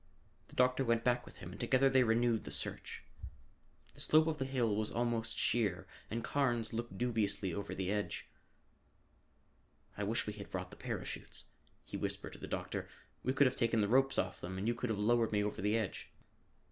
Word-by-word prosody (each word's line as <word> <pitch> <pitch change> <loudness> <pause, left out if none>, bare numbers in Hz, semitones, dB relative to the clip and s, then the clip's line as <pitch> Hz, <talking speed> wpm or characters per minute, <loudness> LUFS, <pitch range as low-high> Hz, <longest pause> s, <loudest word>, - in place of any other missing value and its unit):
The - - -15
doctor 125 +1 +4
went 115 -2 +2
back 120 0 +2
with - - -11
him 90 - -8
and - - -10
together 130 +3 +4
they 135 -1 +5
renewed 115 -1 +3
the - - -6
search. - - -3 0.9
The - - -6
slope 155 0 +5
of 160 -2 -1
the 135 - 0
hill 125 -5 +1
was 110 0 0
almost 115 -1 0
sheer 105 -6 +1 0.2
and 115 +1 -2
Carnes 120 -5 +1
looked 120 +1 -4
dubiously 105 -6 0
over 100 - -4
the 95 0 -1
edge. 105 0 -2 1.7
"I 105 - -3
wish 110 +3 0
we 105 - -3
had 100 -1 -8
brought 90 -1 -4
the - - -10
parachutes," - - -5 0.4
he - - -5
whispered - - -3
to - - -10
the - - -6
doctor. - - -3 0.3
"We 130 - +2
could 140 +1 +5
have 130 - +2
taken 115 -2 +2
the 100 - +2
ropes 135 +4 +4
off 95 0 -1
them 95 +2 -5
and 100 +3 -2
you 120 - +3
could 120 +1 -3
have 110 - 0
lowered 115 +2 +3
me 105 -1 +2
over 105 0 -2
the 105 +3 +2
edge." 110 -4 -3
115 Hz, 200 wpm, -35 LUFS, 105-125 Hz, 1.7 s, they